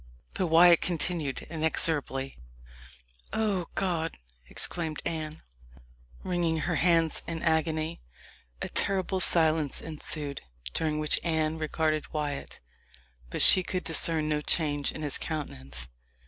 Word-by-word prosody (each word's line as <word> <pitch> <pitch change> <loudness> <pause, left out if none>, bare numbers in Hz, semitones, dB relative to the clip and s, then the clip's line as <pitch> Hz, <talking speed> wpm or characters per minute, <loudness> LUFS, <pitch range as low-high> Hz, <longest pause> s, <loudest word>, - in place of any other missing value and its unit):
But 185 -2 -1
Wyat 170 +1 +6
continued 165 -4 -1
inexorable. 155 -4 -1 1.0
"O 200 -6 0
God!" 170 -4 -1 0.3
exclaimed 160 -3 -4
Anne, 155 -1 -4 0.8
wringing 175 -3 0
her 175 0 -1
hands 165 -2 +2
in 165 -1 -4
agony. 160 0 0 0.6
A - - -3
terrible 190 -1 0
silence 160 -5 +3
ensued, 150 -2 -4 0.3
during 155 -2 0
which 155 0 +1
Anne 160 -1 0
regarded 155 0 -1
Wyat, 150 -2 -4 0.7
but - - +4
she 185 - +8
could 185 0 -3
discern 160 -1 +3
no 150 -1 0
change 145 -2 +1
in 155 - -7
his 145 -2 -1
countenance. 65 - -4
160 Hz, 115 wpm, -28 LUFS, 150-170 Hz, 1.0 s, she